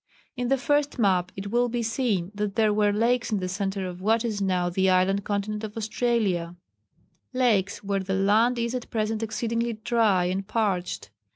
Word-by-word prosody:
In 245 -1 -2
the 270 +2 +2
first 290 +2 0
map 185 -5 +2
it 200 +1 -6
will 240 +1 +2
be 235 0 -2
seen 220 -6 -1
that 205 -1 -3
there 215 -2 +3
were 210 0 +3
lakes 230 +3 +1
in 210 - +1
the 185 - -3
centre 195 +1 -2
of 180 0 -7
what 225 +4 +2
is 210 -3 -2
now 185 -2 +1
the 190 +2 +1
island 185 +2 +2
continent 210 +1 -2
of 215 0 -6
Australia 215 -6 0 0.8
lakes 215 -7 +1
where 200 0 0
the 190 0 -2
land 215 +6 +3
is 235 0 -1
at 250 -2 -4
present 220 0 -1
exceedingly 230 +1 -1
dry 215 -4 +2
and 190 +2 -2
parched. 190 - -1
210 Hz, 185 wpm, -26 LUFS, 190-230 Hz, 0.8 s, there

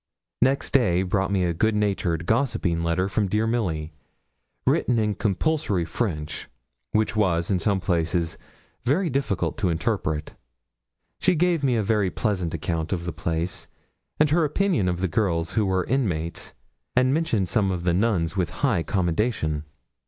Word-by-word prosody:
Next 135 +3 +2
day 95 -9 +3
brought 95 +1 0
me 95 -2 +2
a 85 -1 +1
goodnatured 100 -4 0
gossiping 110 -7 +1
letter 85 +3 +1
from 100 +1 0
dear 105 +3 +1
Milly, 85 -10 -1 0.7
written 120 - +2
in 105 -2 +1
compulsory 105 - 0
French, 80 -5 -3 0.4
which 110 0 +1
was, 90 -4 +1
in 95 - +2
some 100 +1 +1
places, 85 -2 0 0.5
very 155 +7 +1
difficult 100 - -1
to 95 -4 +1
interpret. 80 -2 -1 0.9
She 185 0 +3
gave 170 -2 +2
me 130 -3 +3
a 110 - +1
very 105 -2 +2
pleasant 90 -5 -1
account 80 0 -2
of 85 -3 -2
the 90 - -3
place, 80 +3 -3 0.5
and 150 -1 +4
her 165 +2 +4
opinion 150 - +1
of 90 0 -2
the 95 - +2
girls 85 -3 0
who 110 -3 +2
were 95 -1 +1
inmates, 90 -11 -2 0.4
and 130 +1 +4
mentioned 130 - +1
some 100 -2 +1
of 90 -2 -2
the 90 -1 +2
nuns 90 -4 +1
with 90 -3 0 0.2
high 110 -11 +2
commendation. 85 -4 0
95 Hz, 155 wpm, -25 LUFS, 85-115 Hz, 0.9 s, and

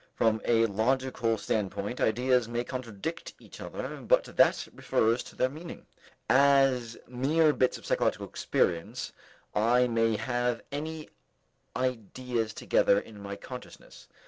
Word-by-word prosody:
From 110 -1 +2
a 115 -1 +4
logical 115 +1 0
standpoint, 105 +2 -2
ideas 125 +1 +2
may 120 +1 -2
contradict 130 +4 -6
each - - -13
other, - - -6
but - - +3
that - - +4
refers 115 +2 +1
to - - -12
their 130 - +2
meaning. 155 +6 -9 0.4
As 135 -4 +4
mere 150 +5 +2
bits 130 - +1
of - - -14
psychological - - 0
experience, 85 -1 -1 0.4
I 120 +4 +3
may 115 -1 +2
have 120 -1 -1
any 155 +2 -5 0.7
ideas 125 -2 -2
together 100 -1 +2
in 105 -1 -12
my 100 0 -6
consciousness. 125 +5 -11
120 Hz, 125 wpm, -29 LUFS, 110-130 Hz, 0.7 s, a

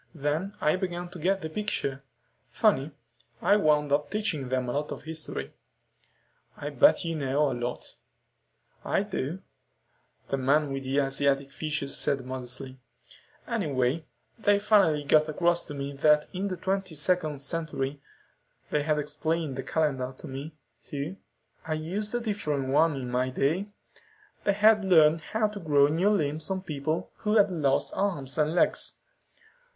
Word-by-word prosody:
Then 155 +7 -2
I 155 +4 +2
began 175 -2 -3
to 175 - -10
get 190 +4 +1
the 160 - -3
picture. 155 -9 -2 0.5
Funny. 135 +3 +2 0.5
I 205 - +4
wound 150 -7 +3
up 145 +1 +1
teaching 180 - -2
them 130 -1 0
a - - -1
lot 145 +3 -2
of - - -6
history." 160 0 -5 1.0
"I 145 +1 -5
bet 140 +4 +5
you 165 - -1
know 140 0 +1
a - - -1
lot." 120 0 -5 0.9
"I 195 - +1
do," 190 -4 -4 0.9
the 135 - 0
man 140 +2 +2
with 135 0 -4
the 135 +2 -1
Asiatic 135 0 0
features 150 -3 -2
said 135 -3 0
modestly. 130 +1 -6 0.7
"Anyway, 155 - 0 0.3
they 205 -1 +4
finally 200 -8 +3
got 155 +2 +4
across 170 +2 +1
to 145 - -6
me 140 0 -4
that 150 +1 +4
in 195 +2 -2
the 185 -2 -3
22nd 180 -5 0
century 140 -2 -3 0.7
they 150 - +2
had 150 +1 +1
explained 150 0 -2
the 135 - -3
calendar 135 -4 -1
to - - -10
me, 140 +4 -7 0.3
too; 145 +6 -5 0.5
I 160 - 0
used 195 +8 -3
a - - +1
different 150 - -2
one 155 +3 +4
in 125 -2 -5
my 125 +1 +1
day 155 +10 0 0.8
they 200 - +4
had 210 +1 +5
learned 160 -4 +5
how 215 +7 0
to 210 -1 -7
grow 145 -4 +4
new 170 +7 +2
limbs 155 -5 0
on 190 -1 -2
people 155 -1 -3
who 210 0 0
had 200 -2 +5
lost 140 -6 +1
arms 160 -8 -2
and 155 +2 +2
legs." - - +1
150 Hz, 155 wpm, -28 LUFS, 140-180 Hz, 1.0 s, bet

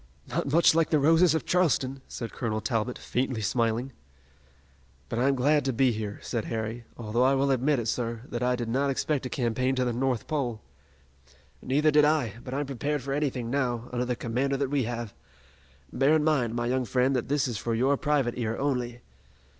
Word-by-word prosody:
"Not 140 - -2
much 165 +1 +5
like 165 -1 +2
the 155 - +3
roses 160 +4 +4
of 160 - -2
Charleston," 135 -7 +1
said 115 - -6
Colonel 110 -3 -2
Talbot, 115 +3 -1
faintly 125 -1 -2
smiling. 115 +4 0 1.2
"But 115 - -2
I'm 135 +2 +3
glad 145 +3 +3
to 135 - 0
be 130 +2 +3
here," 105 -2 -4
said 115 -3 -3
Harry, 115 +1 -4
"although 115 +1 -1
I 135 +2 +4
will 135 +1 +2
admit, 130 -2 +1
sir, 115 0 -2
that 120 - -4
I 125 0 +2
did 120 -2 -4
not 135 +5 +1
expect 135 0 -1
a - - -9
campaign 130 +1 0
to 130 -1 +1
the 120 - 0
North 125 -1 -1
Pole." 130 -8 -2 1.0
"Neither 150 +4 +2
did 150 0 +5
I, 150 -8 +2
but 125 - -7
I'm 145 +2 -1
prepared 140 +1 -2
for 135 +1 -3
anything 130 -5 -1
now, 125 -4 -1
under 125 0 0
the 125 0 -1
commander 130 +4 -1
that 140 -1 -1
we 140 -4 +1
have. 120 -2 -4 0.8
Bear 140 +4 +4
in 155 - +2
mind, 130 -7 +1
my 120 0 -1
young 130 +1 0
friend, 130 +3 +1
that 125 - -1
this 145 -1 +1
is 115 -5 -3
for 115 -1 -1
your 130 +5 +3
private 140 -4 0
ear 115 -1 -1
only." 125 -4 -2
130 Hz, 200 wpm, -27 LUFS, 120-140 Hz, 1.2 s, much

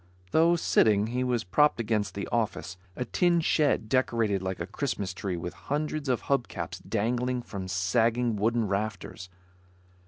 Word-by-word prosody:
Though 165 +2 +4
sitting, 105 -10 +3
he 125 +1 0
was 125 -2 0
propped 145 +11 +3
against 110 -2 -1
the 100 - -4
office; 110 -5 -1 0.2
a 125 - -3
tin 175 +6 +2
shed 150 -7 +2
decorated 115 -5 +1
like 95 0 -3
a 85 - -2
Christmas 100 -3 -3
tree 95 -1 -3
with 85 +1 -5 0.2
hundreds 150 0 -1
of 125 - +1
hub 135 -3 0
caps - - -6
dangling 125 +3 -1
from 95 -5 -6
sagging 115 +6 +1
wooden 110 +2 +1
rafters. 100 -2 -4
115 Hz, 155 wpm, -28 LUFS, 100-125 Hz, 0.2 s, Though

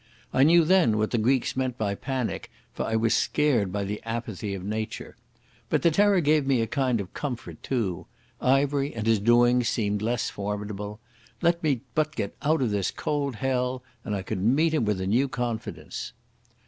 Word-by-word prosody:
I 130 - +3
knew 165 +3 +6
then 165 - +4
what 110 0 0
the 120 - +1
Greeks 125 +3 +1
meant 130 -2 -1
by 100 -2 -1
panic, 130 +3 -3 0.2
for - - -3
I 110 - 0
was 115 0 +2
scared 125 -11 +2
by 100 +1 -2
the 105 +2 -4
apathy 115 -3 -4
of 95 - -7
nature. 110 +1 -4 0.5
But - - +1
the 170 - +5
terror 200 +2 +4
gave 150 -2 +2
me 135 -3 +3
a - - +1
kind 130 -2 0
of 95 -2 -6
comfort, 130 -5 -5
too. 110 -10 -2 0.3
Ivery 140 +1 +2
and 110 -2 -3
his 115 -2 +3
doings 120 +2 +4
seemed 105 -2 -1
less 120 +2 -1
formidable. 105 +1 -5 0.4
Let 170 0 +3
me 140 -7 +1
but 155 0 0
get 100 - -3
out 150 -1 +2
of 115 - 0
this 100 -2 0
cold 140 -4 -2
hell 125 0 -1 0.2
and 105 - -2
I 95 - -3
could 95 - -3
meet 145 - +3
him 150 -8 +1
with 105 -2 0
a 95 - -2
new 120 +8 +2
confidence. 120 -4 -4
120 Hz, 190 wpm, -26 LUFS, 105-140 Hz, 0.5 s, knew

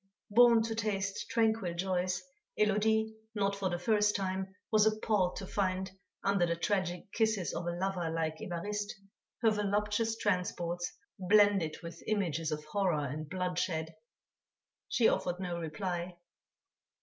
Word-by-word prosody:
Born 235 0 +7
to 225 0 -2
taste 205 -3 -2
tranquil 220 -6 +1
joys, 180 0 -1 0.4
Élodie 220 +1 +2 0.2
not 200 -1 +1
for 195 -1 -1
the 175 - -1
first 210 +3 +2
time 190 0 -2 0.2
was 215 -1 +5
appalled 215 -4 +1
to 195 - -5
find, 190 -1 -1 0.3
under 195 -3 +3
the 170 - 0
tragic 185 +1 -1
kisses 220 -5 +1
of 170 +1 -3
a - - +1
lover 185 -2 -1
like 160 -1 -1
Évariste, 205 +4 -3 0.5
her 225 - +6
voluptuous 210 +2 0
transports 175 -3 -1 0.3
blended 195 -4 +4
with 170 0 -8
images 165 -7 0
of 150 0 -3
horror 165 -3 0
and 145 +3 -5
bloodshed; 180 -3 -1 1.0
she 235 - +4
offered 180 0 0
no 175 -2 -3
reply. 175 +2 -3
190 Hz, 135 wpm, -32 LUFS, 175-210 Hz, 1.0 s, Born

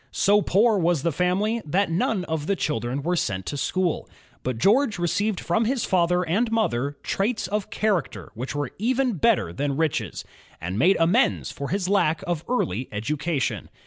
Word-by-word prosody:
So 205 +1 +3
poor 210 +2 +3
was 170 -4 +1
the 170 - +1
family, 190 +8 0
that 180 +4 0
none 180 +2 0
of 160 -2 -3
the 200 - +2
children 140 -5 -2
were 175 +3 0
sent 95 - -2
to - - -4
school. 175 +4 -1 0.3
But 130 -2 -3
George 220 - +3
received 190 +4 0
from 220 +7 0
his 250 +1 0
father 180 -1 +2
and 205 +8 0
mother 145 - 0
traits 215 +4 -1
of 205 +2 -2
character 205 -6 -1
which 125 +5 -5
were 145 -3 -2
even 250 0 +1
better 190 - +2
than 140 +5 -2
riches, 160 -3 -1 0.3
and 90 +5 -4
made 185 +8 +4
amends 185 +11 +2
for 140 - -6
his 190 -1 -1
lack 185 -4 +2
of 175 -3 -2
early 125 - -1
education. 145 +7 -2
175 Hz, 175 wpm, -24 LUFS, 145-210 Hz, 0.3 s, made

